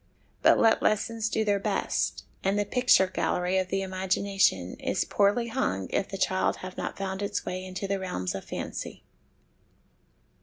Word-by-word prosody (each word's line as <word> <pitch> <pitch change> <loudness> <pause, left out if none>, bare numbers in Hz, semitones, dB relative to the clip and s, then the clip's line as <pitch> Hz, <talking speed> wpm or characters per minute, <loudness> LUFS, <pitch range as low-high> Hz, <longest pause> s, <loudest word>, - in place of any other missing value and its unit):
But - - +6
let 225 -1 +4
lessons 220 +1 +1
do 220 -1 0
their 205 -1 +2
best, - - -1 0.2
and 195 +1 +1
the 205 - +1
picture 250 -3 +4
gallery 185 0 0
of 185 - -1
the 195 +1 -1
imagination 190 - +1
is - - 0
poorly 210 +4 +2
hung 95 - -1
if - - 0
the 195 - -5
child 190 0 +1
have 185 - -7
not - - -4
found 190 0 -3
his 200 - -2
way 185 +1 -4
into 185 +1 -5
the 200 0 -1
realms 135 - -3
of 95 - -5
fancy. - - -6
195 Hz, 165 wpm, -28 LUFS, 185-205 Hz, 0.2 s, But